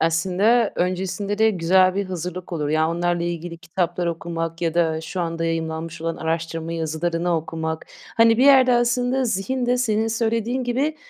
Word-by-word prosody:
Aslında 190 +8 +2
öncesinde 190 +3 -2
de 220 0 +5
güzel 185 0 +3
bir 200 0 -1
hazırlık 180 0 -6
olur. 150 -3 -2
Ya, 155 +1 +2
onlarla 175 0 0
ilgili 170 0 -4
kitaplar 175 0 -2
okumak 165 0 -4
ya 165 -1 0
da 160 -2 +1
şu 165 +3 -5
anda 165 -1 -2
yayımlanmış 165 0 -3
olan 165 0 -3
araştırma 165 0 -3
yazılarını 165 +1 -1
okumak. 160 0 -4 0.3
Hani, 230 0 +5
bir 260 - +5
yerde 265 -3 +6
aslında 245 +2 +1
zihin 240 +4 -1
de 250 +1 +2
senin 225 -2 +1
söylediğin 230 +2 -1
gibi, 275 +6 -1
175 Hz, 160 wpm, -22 LUFS, 165-225 Hz, 0.3 s, yerde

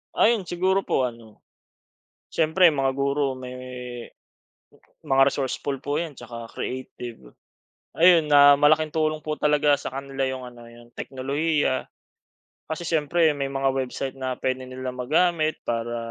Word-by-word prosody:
Ayun, 220 -5 +3
siguro 185 +3 +1
po 135 - 0
ano, 115 -3 -7 0.8
siyempre 165 +3 +3
mga 135 -4 +2
guro 140 +1 0
may 125 0 -8
m 125 - -9 1.4
mga 135 -2 +3
resourceful 135 0 -3
po 145 +4 -2
'yan 160 -6 -7
tsaka 115 -1 -9
creative. 120 - -7 0.6
Ayun, 170 -2 +7
na 145 0 +8
malaking 155 +2 +4
tulong 155 0 -1
po 155 0 -4
talaga 150 -1 +3
sa 140 - -7
kanila 135 0 -3
yung 130 -1 -4
ano, 120 -1 -14
yung 120 0 -15
teknolohiya. 140 +1 -1 0.9
Kasi 160 +2 -4
siyempre 160 0 +2
may 140 -1 -3
mga 135 0 0
website 130 0 -3
na 130 -1 -4
pwede 130 0 -3
nilang 130 0 -5
magamit 155 +3 +1
para 120 0 -2
140 Hz, 140 wpm, -24 LUFS, 130-155 Hz, 1.4 s, na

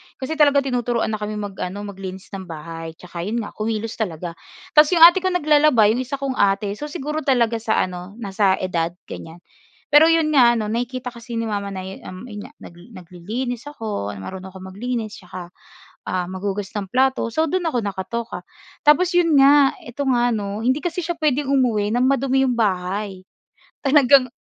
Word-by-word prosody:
Kasi 310 +4 -5
talaga 285 -2 +5
tinuturuan 245 -3 -1
na 215 - -3
kami 210 0 -4
mag-ano, 200 -1 -5
maglinis 190 -1 -8
ng 190 -2 -7
bahay 165 0 -8
'tsaka 175 0 -10
'yon 215 +6 -2
nga - - -8
kumilos 220 +1 -3
talaga. 175 -4 -3 0.4
Tas 300 0 +7
'yong 330 - +7
ate 345 +2 +9
ko 375 - -1
naglalaba. 300 - +4
'Yong 240 - -1
isa 280 - -2
kong 275 -1 -4
ate. 200 0 +2
So 295 - -4
siguro 300 0 -4
talaga 235 -6 +1
sa 220 0 +1
ano, 180 +2 -7
nasa 200 -3 +1
edad, 170 -2 -1
ganyan. 165 +2 -10 0.5
Pero 300 +2 +8
'yon 325 -2 +3
nga 240 -4 +5
ano, 215 -2 -2
nakikita 250 +2 -3
kasi 235 0 -9
ni 230 - -1
mama 205 -2 -3
na 190 -1 -5
'yo 190 +1 -8
um, 185 +4 -9
'yon 205 0 -7
nga 280 - -18
nag 170 - -12 0.2
naglilinis 220 - -5
ako, 210 - -4
marunong 185 - -8
ako 190 0 -9
maglinis 225 0 -4
'tsaka, 180 -1 -9 0.6
um, 180 -1 -1
maghugas 195 +1 -4
ng 200 -2 -3
plato, 260 -1 +2
so 315 - +2
do'n 355 +1 -1
ako 250 -7 0
nakatoka. 215 +4 -4 0.5
Tapos 345 +5 +5
'yon 335 -4 +4
nga, 275 0 +6
ito 245 +4 -5
nga 245 -1 +2
'no, 205 0 -3
hindi 260 +4 +2
kasi 350 +1 -3
siya 335 0 -4
puwedeng 290 -3 +1
umuwi 225 -6 +2
ng 250 - +2
madumi 270 0 +2
'yong 250 - 0
bahay 195 -2 -1 0.6
talagang 275 -2 +5
225 Hz, 185 wpm, -21 LUFS, 195-275 Hz, 0.6 s, ate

